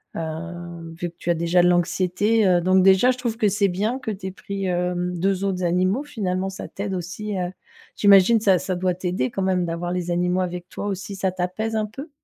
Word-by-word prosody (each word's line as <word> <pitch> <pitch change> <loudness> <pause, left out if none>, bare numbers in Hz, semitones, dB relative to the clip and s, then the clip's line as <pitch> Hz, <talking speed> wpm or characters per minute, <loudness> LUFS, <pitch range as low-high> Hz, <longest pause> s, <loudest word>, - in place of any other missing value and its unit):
hem, 170 +1 -6
vu 175 -1 -3
que 170 - -40
tu - - -4
as 170 - +3
déjà 170 +2 +3
de 175 - +4
l'anxiété 185 +5 +2
heu, 180 -1 +4
donc 185 +2 +4
déjà, 195 +6 +5
je 255 - -4
trouve 235 -3 -2
que 215 - +2
c'est 200 +1 +2
bien 210 +8 -1
que 240 - -5
tu 200 -2 -5
aies 190 - -4
pris, 195 +1 -5
hem, 180 0 -1
2 195 +1 0
autres 190 -2 -1
animaux, 185 +8 +1
finalement, 195 -9 -2
ça 190 - -7
t'aide 200 -1 -4
aussi, 190 +3 -4
heu, 180 -1 -2 0.4
j'imagine, 200 +2 +6
ça 195 -4 +4
ça 185 - -3
doit 180 0 0
t'aider 180 -8 -1
quand 195 - -4
même 185 -2 +1
d'avoir 170 +1 -3
les 180 -1 -2
animaux 180 +1 +1
avec 180 -1 -4
toi - - -6
aussi. 200 +1 -4
Ça 190 -1 0
t'apaise 185 +5 -3
un 215 -1 +1
peu? 270 +9 -9
185 Hz, 225 wpm, -23 LUFS, 175-200 Hz, 0.4 s, j'imagine